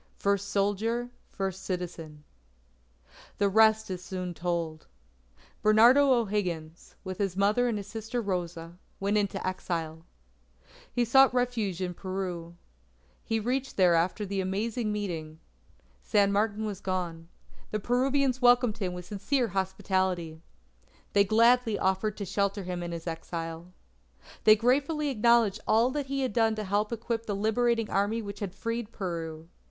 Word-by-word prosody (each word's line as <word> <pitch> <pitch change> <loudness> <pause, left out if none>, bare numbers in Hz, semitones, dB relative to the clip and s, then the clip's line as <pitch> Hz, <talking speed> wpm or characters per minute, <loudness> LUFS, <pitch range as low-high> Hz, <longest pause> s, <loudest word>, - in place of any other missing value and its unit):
FIRST 200 0 0
SOLDIER, 220 +5 0 0.2
FIRST 190 -1 -4
CITIZEN 165 -5 -5 1.1
The 200 -1 +2
rest 220 0 +4
is 180 -1 -5
soon 180 -1 -5
told. 170 -2 -3 0.7
Bernardo 235 +6 +6
O'Higgins, 185 -9 -2
with 190 0 -6
his 195 -2 -1
mother 210 +5 +3
and 230 -3 0
his 200 - -5
sister 225 +3 -4
Rosa, 175 -4 -4 0.2
went 200 +2 0
into 200 -1 -2
exile. 165 -3 -3 0.9
He 245 -1 +1
sought 270 +3 +6
refuge 230 -7 -1
in 180 -1 -3
Peru. 180 -2 -5 0.7
He 225 -1 -1
reached 260 +4 -2
there 180 -3 +5
after 175 +5 +1
the 195 0 -2
Amazing 210 +4 -2
Meeting. 165 -7 -4 0.6
San 200 - +2
Martin 210 +1 0
was 205 -2 -5
gone. 175 -3 -3 0.4
The 215 - -2
Peruvians 260 +3 +1
welcomed 245 -3 +4
him 185 -3 -2
with 180 -1 -7
sincere 225 +6 -1
hospitality. 185 -3 -1 0.7
They 200 0 +5
gladly 230 +1 +4
offered 190 +2 0
to 200 - -4
shelter 200 +1 -1
him 180 -1 -4
in 175 0 -4
his 170 -1 -6
exile. 165 0 -5 0.7
They 215 - +9
gratefully 285 +6 +1
acknowledged 230 -4 +3
all 230 +4 +4
that 285 0 -3
he 275 0 -2
had 255 -5 -1
done 225 -1 +2
to 215 - -3
help 205 +2 0
equip 230 0 -3
the 205 - -1
Liberating 225 +2 +1
Army 205 +4 0
which 200 -1 -7
had 195 -3 -5
freed 230 0 -4
Peru. 165 -5 -5
200 Hz, 145 wpm, -28 LUFS, 180-230 Hz, 1.1 s, They